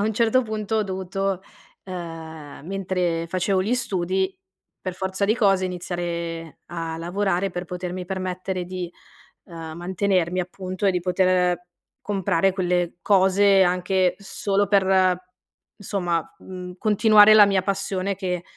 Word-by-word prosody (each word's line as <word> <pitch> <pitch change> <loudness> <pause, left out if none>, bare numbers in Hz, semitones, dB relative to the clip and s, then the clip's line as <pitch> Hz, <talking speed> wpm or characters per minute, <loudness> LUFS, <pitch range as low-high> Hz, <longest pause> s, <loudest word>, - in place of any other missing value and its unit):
a - - +1
un 220 - 0
certo 235 +3 +3
punto 215 -1 -3
ho 215 - +2
dovuto, 190 0 -2 0.4
ehm, 165 -5 -8
mentre 180 -3 -1
facevo 185 +2 0
gli 230 +6 +1
studi, 190 -4 -1 0.5
per 185 -1 -4
forza 190 +1 -2
di 215 +3 +3
cose, 195 -5 +3
iniziare 170 -2 -4
a 165 -1 -4
lavorare 190 +2 -1
per 175 0 -4
potermi 180 +1 -5
permettere 185 -1 -3
di, 180 -1 -5 0.6
uhm, 165 -2 -8
mantenermi 185 0 0
appunto, 185 +2 -5
e 195 - +5
di 180 - 0
poter 180 -1 +1 0.4
comprare 195 -2 +1
quelle 180 -2 -1
cose, 195 0 +5
anche 180 +1 +1
solo 200 0 -1
per, 190 -2 +3 0.6
insomma, 180 -4 -1 0.2
mhmm, 180 -1 -8
continuare 215 0 +6
la 210 -1 +9
mia 195 -1 +2
passione 195 0 -1
che 180 -2 -3
185 Hz, 135 wpm, -23 LUFS, 175-195 Hz, 0.6 s, la